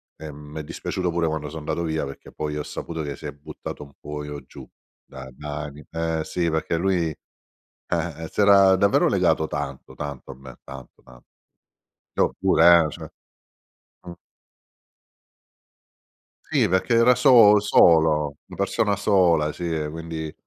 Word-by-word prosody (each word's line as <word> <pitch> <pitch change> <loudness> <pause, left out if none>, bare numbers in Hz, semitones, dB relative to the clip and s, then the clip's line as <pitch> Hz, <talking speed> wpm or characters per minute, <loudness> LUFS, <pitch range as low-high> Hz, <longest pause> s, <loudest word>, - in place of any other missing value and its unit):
E 80 -1 -9
mi 75 +2 -10
è - - -5
dispiaciuto 90 +3 -4
pure 85 0 -1
quando 75 -2 -3
so' 80 - -8
andato 80 +2 -3
via, 80 -3 -2
perché 70 - -11
poi 75 -1 -4
ho 75 - -3
saputo 80 -1 -6
che 70 -2 -5
si - - -13
è - - -4
buttato 70 0 -9
un 70 -1 -16
pochino 75 -1 -7
giù - - -13 0.4
da 65 -1 -11
da 75 +1 -7
anni. 75 0 -10
Eh 80 -1 -2
sì, 85 -1 -2
perché 80 +1 -1
lui, 90 -2 0 0.6
eh 80 -2 -5
si - - -8
era 100 -2 +6
davvero 100 +1 +3
legato 80 - +1
tanto, 70 -2 -6
tanto 70 -2 -7
a - - -11
me 65 -1 -13
tanto, 65 -2 -12
tanto. - - -18 0.9
Io - - +1
pure 85 0 +5
eh, - - -7
cioè - - -9 1.0
mh. 85 - -7 2.3
Sì, - - +1
perché 95 +6 +1
era 120 +2 +5
so 115 -7 +7
solo, 80 -7 +3
una - - -12
persona 105 -2 0
sola, 90 -7 +2
sì, 90 - -8
e 75 -1 -3
quindi 80 -1 -6
80 Hz, 160 wpm, -23 LUFS, 75-85 Hz, 2.3 s, so